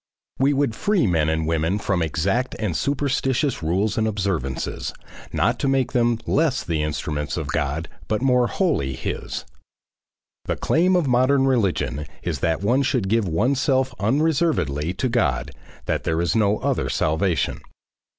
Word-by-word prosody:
We 135 Hz, +2 st, +4 dB
would 140 Hz, -4 st, +1 dB
free 205 Hz, -, +1 dB
men 80 Hz, -5 st, +2 dB
and 80 Hz, 0 st, 0 dB
women 80 Hz, +4 st, 0 dB
from 100 Hz, -4 st, -1 dB
exact 95 Hz, -, 0 dB
and 100 Hz, -7 st, -2 dB
superstitious 135 Hz, -1 st, 0 dB
rules 95 Hz, +8 st, 0 dB
and 110 Hz, -, +1 dB
observances, 95 Hz, -11 st, -2 dB, 0.4 s
not -, -, +1 dB
to -, -, 0 dB
make 135 Hz, -2 st, +1 dB
them 120 Hz, -1 st, +2 dB
less 150 Hz, -4 st, +1 dB
the 80 Hz, -2 st, -1 dB
instruments 75 Hz, 0 st, -3 dB
of 80 Hz, -4 st, -4 dB
God 80 Hz, +1 st, -1 dB, 0.2 s
but 105 Hz, 0 st, 0 dB
more 125 Hz, -2 st, +3 dB
wholly 135 Hz, -, 0 dB
his. -, -, -4 dB, 1.0 s
The -, -, -1 dB
claim 180 Hz, +3 st, +2 dB
of 175 Hz, -5 st, +2 dB
modern 130 Hz, +2 st, +3 dB
religion 85 Hz, -, 0 dB, 0.2 s
is 80 Hz, -5 st, -2 dB
that 80 Hz, +6 st, 0 dB
one 125 Hz, +7 st, +3 dB
should 125 Hz, -7 st, 0 dB
give 110 Hz, -2 st, +2 dB
oneself 130 Hz, -, +1 dB
unreservedly 115 Hz, -, +1 dB
to 130 Hz, -, 0 dB
God, 75 Hz, -, 0 dB, 0.3 s
that -, -, -1 dB
there 80 Hz, 0 st, 0 dB
is 85 Hz, +4 st, 0 dB
no 105 Hz, -1 st, +3 dB
other -, -, -1 dB
salvation. 80 Hz, +3 st, 0 dB
105 Hz, 150 wpm, -23 LUFS, 80-135 Hz, 1.0 s, We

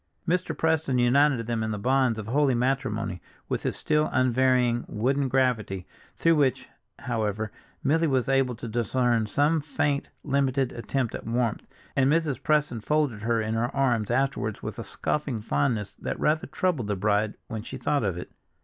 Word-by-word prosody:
Mr. 180 Hz, +2 st, 0 dB
Preston 160 Hz, -5 st, +1 dB
united 125 Hz, 0 st, +3 dB
them 115 Hz, -1 st, -1 dB
in 110 Hz, -, -1 dB
the 105 Hz, -, -2 dB
bonds 125 Hz, +1 st, +2 dB
of 110 Hz, -, -5 dB
holy 135 Hz, +3 st, +2 dB
matrimony 115 Hz, -7 st, -1 dB, 0.3 s
with -, -, -2 dB
his -, -, -2 dB
still 150 Hz, 0 st, +1 dB
unvarying 125 Hz, -1 st, +2 dB
wooden 135 Hz, +6 st, 0 dB
gravity, 120 Hz, -8 st, 0 dB, 0.3 s
through 165 Hz, 0 st, +3 dB
which, 135 Hz, -4 st, +1 dB, 0.3 s
however, 110 Hz, -2 st, -2 dB, 0.3 s
Milly 160 Hz, +4 st, +3 dB
was 130 Hz, -4 st, +1 dB
able 135 Hz, -2 st, +2 dB
to 115 Hz, -, -7 dB
discern 120 Hz, 0 st, +1 dB
some 145 Hz, +9 st, +2 dB
faint, 145 Hz, -1 st, -1 dB
limited 135 Hz, -2 st, +1 dB
attempt 120 Hz, 0 st, -2 dB
at -, -, -6 dB
warmth, 115 Hz, -1 st, -1 dB, 0.3 s
and 135 Hz, +1 st, +3 dB
Mrs. 150 Hz, -5 st, +1 dB
Preston 150 Hz, -6 st, +1 dB
folded 145 Hz, -4 st, 0 dB
her 115 Hz, +1 st, +1 dB
in 110 Hz, +1 st, -2 dB
her 115 Hz, +2 st, 0 dB
arms 120 Hz, -6 st, +1 dB
afterwards 120 Hz, -4 st, -1 dB
with -, -, -5 dB
a -, -, -3 dB
scoffing 140 Hz, -6 st, -2 dB
fondness 100 Hz, +3 st, -1 dB
that -, -, -4 dB
rather 155 Hz, +1 st, +1 dB
troubled 175 Hz, -, -1 dB
the 105 Hz, -, 0 dB
bride 105 Hz, +2 st, +1 dB
when 110 Hz, -1 st, -5 dB
she 110 Hz, -, -7 dB
thought 145 Hz, -4 st, 0 dB
of 95 Hz, -4 st, -1 dB
it. 90 Hz, -, -7 dB
125 Hz, 170 wpm, -26 LUFS, 110-140 Hz, 0.3 s, united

